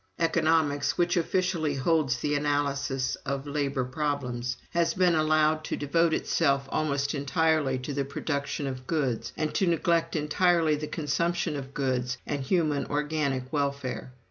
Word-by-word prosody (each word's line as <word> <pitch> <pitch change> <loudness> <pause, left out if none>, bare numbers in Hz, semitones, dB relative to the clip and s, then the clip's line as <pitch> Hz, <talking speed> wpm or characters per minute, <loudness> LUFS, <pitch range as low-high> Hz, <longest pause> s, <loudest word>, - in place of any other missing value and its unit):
"Economics 160 -3 +2
(which 175 +1 +2
officially 170 -3 0
holds 135 -2 +1
the 145 +4 -1
analysis 145 -2 0
of 140 0 -4
labor 140 -2 -1
problems) 125 -3 -2
has 170 -1 +1
been 180 -2 +4
allowed 155 0 +3
to - - -3
devote 165 +3 +2
itself 140 -4 +1
almost 140 -2 0
entirely 145 -1 +1
to 130 +3 -5
the 140 0 0
production 140 +1 -3
of 130 -1 -5
goods, 135 -8 -1
and 155 -1 -1
to 190 - +1
neglect 170 0 +1
entirely 160 +1 +2
the 150 +1 -4
consumption 170 +2 -1
of 135 -1 -7
goods 125 -2 -1
and 145 -2 -2
human 150 -1 +1
organic 145 -3 -1
welfare. 140 -3 -2
145 Hz, 145 wpm, -28 LUFS, 140-160 Hz, -, been